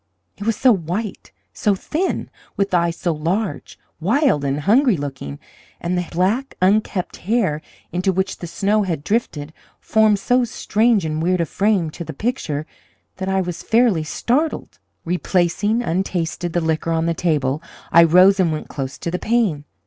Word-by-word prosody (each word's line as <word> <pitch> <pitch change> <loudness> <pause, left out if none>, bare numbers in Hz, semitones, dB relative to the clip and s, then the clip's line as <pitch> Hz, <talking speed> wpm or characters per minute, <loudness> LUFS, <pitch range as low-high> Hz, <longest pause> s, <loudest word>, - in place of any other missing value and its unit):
It 205 - -6
was 225 - +2
so 255 +3 +4
white, 195 +2 -3 0.2
so 205 -2 +1
thin, 325 - -2 0.3
with 200 -1 0
eyes 170 -1 +2
so 175 - -1
large, 180 +7 -3 0.2
wild, 225 - +2
and 140 +1 -1
hungry 230 - +4
looking, 135 - -6 0.4
and 175 +1 -2
the 180 -1 -1
black, 200 +10 0
unkempt 190 -1 +1
hair, 190 -7 0 0.3
into 185 +3 +1
which 190 +1 -1
the 175 - -6
snow 205 +5 +1
had 170 -7 -2
drifted, 155 -9 -2 0.3
formed 220 -2 +3
so 245 +5 +2
strange 220 -3 +1
and 155 0 -2
weird 180 +2 +1
a 170 - +2
frame 195 -1 +1
to 170 - -7
the - - -7
picture, 155 - -2 0.5
that 190 0 -3
I 190 0 +2
was 175 -2 -4
fairly 225 -8 +3
startled. 260 - -1 0.3
Replacing, 180 +5 +1
untasted, 175 -2 -2
the 175 - +1
liquor 160 0 -1
on 165 0 +1
the 170 - +1
table, 150 -4 0 0.3
I 170 - +8
rose 185 +4 +6
and 175 -4 +3
went 155 - -4
close 135 -1 -5
to 170 - -4
the 180 - -2
pane. 210 -11 0
180 Hz, 165 wpm, -20 LUFS, 160-215 Hz, 0.5 s, I